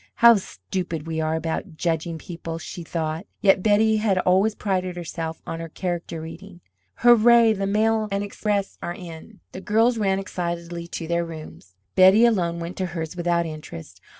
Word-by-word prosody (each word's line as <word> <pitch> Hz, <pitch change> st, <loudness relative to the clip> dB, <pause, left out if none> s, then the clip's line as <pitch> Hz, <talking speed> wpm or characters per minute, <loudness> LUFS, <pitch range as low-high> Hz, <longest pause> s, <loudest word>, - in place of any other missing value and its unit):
"How 235 Hz, 0 st, +8 dB
stupid 165 Hz, -, -5 dB
we 160 Hz, -1 st, -2 dB
are 155 Hz, 0 st, 0 dB
about 160 Hz, 0 st, -4 dB
judging 165 Hz, -1 st, -1 dB
people!" 165 Hz, 0 st, -7 dB
she 175 Hz, -, -8 dB
thought. 160 Hz, +2 st, -3 dB
Yet 195 Hz, -2 st, +4 dB
Betty 215 Hz, +2 st, +3 dB
had 210 Hz, -3 st, +1 dB
always 190 Hz, +4 st, +3 dB
prided 185 Hz, -3 st, -2 dB
herself 165 Hz, -2 st, -5 dB
on 165 Hz, -, -5 dB
her 165 Hz, 0 st, -6 dB
character 170 Hz, -1 st, -4 dB
reading. 175 Hz, +3 st, -10 dB, 0.3 s
"Hurrah, 235 Hz, -1 st, +6 dB
the 195 Hz, -1 st, -2 dB
mail 215 Hz, +1 st, +2 dB
and 200 Hz, 0 st, -1 dB
express 205 Hz, -1 st, -2 dB
are 175 Hz, -, -4 dB
in!" 180 Hz, +4 st, -11 dB
The 185 Hz, -, -8 dB
girls 225 Hz, +4 st, +2 dB
ran 195 Hz, -2 st, +1 dB
excitedly 170 Hz, -2 st, -4 dB
to 165 Hz, -1 st, -6 dB
their 170 Hz, +1 st, 0 dB
rooms. 155 Hz, -, -10 dB, 0.2 s
Betty 190 Hz, +5 st, +7 dB
alone 175 Hz, -7 st, +1 dB
went 170 Hz, +2 st, -6 dB
to 185 Hz, -, -1 dB
hers 160 Hz, +1 st, -4 dB
without 170 Hz, -1 st, 0 dB
interest. 95 Hz, -, -9 dB
175 Hz, 170 wpm, -24 LUFS, 165-200 Hz, 0.3 s, How